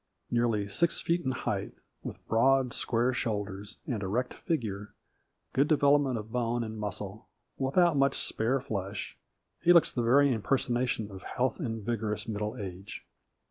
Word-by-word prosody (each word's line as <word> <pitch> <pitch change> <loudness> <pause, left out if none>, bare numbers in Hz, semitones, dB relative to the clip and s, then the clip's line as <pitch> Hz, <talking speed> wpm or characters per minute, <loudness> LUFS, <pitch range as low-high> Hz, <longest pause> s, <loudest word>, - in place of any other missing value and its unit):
Nearly 115 -4 +1
six 170 +12 +2
feet 170 +1 0
in 130 - 0
height, 130 - -2 0.3
with - - -8
broad, 130 +2 +3
square 120 +2 +1
shoulders 105 -4 -3
and 120 -8 -2
erect 115 +6 -1
figure, 105 -10 -3 0.6
good 140 +3 +3
development 145 -4 +4
of 110 0 -7
bone 120 -1 0
and 110 -1 -6
muscle, 105 0 -5 0.3
without 155 +5 +3
much 140 0 +3
spare 120 +5 0
flesh, 100 -5 -4 0.5
he 175 - +5
looks 170 -2 +6
the 120 - -1
very 135 +4 +5
impersonation 120 -1 0
of 95 -1 -9
health 130 +7 -1
and 115 - -3
vigorous 110 -2 -2
middle 105 +2 -3
age. 95 -2 -7
115 Hz, 145 wpm, -30 LUFS, 105-135 Hz, 0.6 s, looks